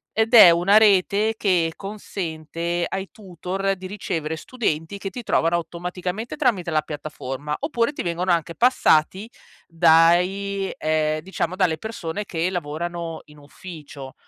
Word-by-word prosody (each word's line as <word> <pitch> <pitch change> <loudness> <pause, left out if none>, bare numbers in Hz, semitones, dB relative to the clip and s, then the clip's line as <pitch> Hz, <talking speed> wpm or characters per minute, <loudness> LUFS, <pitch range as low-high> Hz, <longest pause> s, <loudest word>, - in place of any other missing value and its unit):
ed 225 +2 +1
è 180 -6 +10
una 180 +5 +4
rete 210 +1 +3
che 170 -5 +1
consente 170 -4 -4
ai 195 0 -5
tutor 195 -1 -3
di 185 0 -8
ricevere 165 -6 -4
studenti, 180 -3 -3
che 195 - -4
ti 240 +5 -8
trovano 165 -4 +1
automaticamente 180 +5 -4
tramite 185 -7 0
la 155 -2 +1
piattaforma, 150 -1 -5
oppure 280 -3 -1
ti - - -5
vengono 175 +1 -1
anche 170 0 0
passati 200 -5 +2 0.4
dai 180 +4 +3
ehm, 155 0 0
diciamo 185 0 -3
dalle 175 -5 +1
persone 210 -3 -5
che 170 -1 -2
lavorano 170 0 -4
in 150 -1 -17
ufficio. 145 -3 -11
175 Hz, 135 wpm, -22 LUFS, 160-195 Hz, 0.4 s, è